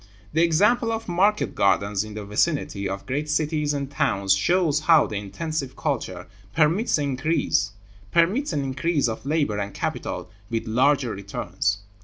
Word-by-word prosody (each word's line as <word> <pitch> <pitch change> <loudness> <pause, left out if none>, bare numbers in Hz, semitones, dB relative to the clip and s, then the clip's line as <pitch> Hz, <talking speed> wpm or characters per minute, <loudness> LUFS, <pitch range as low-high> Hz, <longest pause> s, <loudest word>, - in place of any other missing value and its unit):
The 160 - +3
example 205 +8 +3
of 225 0 -3
market 195 +4 +2
gardens 100 +1 +2
in 110 -1 -9
the 105 -1 -6
vicinity 105 - 0
of 95 0 -5
great 145 +4 -2
cities 150 0 0
and 140 -1 -2
towns 100 -9 +2
shows 160 - +2
how 155 -1 +5
the 105 - -6
intensive 135 +7 -4
culture 95 - -3 0.3
permits 165 +10 +3
an 140 -3 -2
increase 145 - 0
of 110 +2 -5
labor 145 -9 +1
and 100 0 -4
capital - - -4 0.2
with 115 -1 -2
larger 130 +2 +2
returns. 100 0 -2
140 Hz, 140 wpm, -24 LUFS, 105-160 Hz, 0.3 s, how